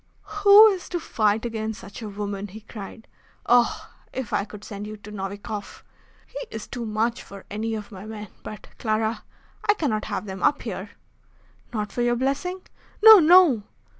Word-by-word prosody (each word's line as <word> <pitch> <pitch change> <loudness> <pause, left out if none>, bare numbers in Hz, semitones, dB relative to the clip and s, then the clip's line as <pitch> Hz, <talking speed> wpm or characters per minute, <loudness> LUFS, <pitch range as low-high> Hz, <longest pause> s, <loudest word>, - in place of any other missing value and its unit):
"Who 405 +1 +9
is 380 -3 -4
to 350 - -2
fight 220 -6 0
against 220 -2 -4
such 200 +4 -10
a 215 - -5
woman?" 200 0 -5
he 210 +3 -11
cried. 215 +1 -10 0.4
"Oh! 245 0 +3 0.2
if 260 -4 -5
I 200 - +1
could 210 -1 -11
send 205 0 -7
you 215 0 -7
to 210 0 -12
Novikoff! 200 +1 -6 0.4
He - - -8
is 220 - -7
too 240 -3 -6
much 225 +3 -1
for 200 -1 -12
any 220 +2 -2
of 210 0 -7
my 195 +1 -9
men. 210 -2 -8
But, 215 - -9
Clara, 220 0 -1 0.5
I 420 - +6
cannot 245 - -1
have - - -4
them 190 -2 -7
up 290 - +2
here." 200 -3 -5 0.8
"Not 210 -3 -3
for 245 - -3
your 240 0 +2
blessing?" 280 +9 -2 0.4
"No, 440 -2 +11
no!" 330 - +6
220 Hz, 175 wpm, -24 LUFS, 205-245 Hz, 0.8 s, No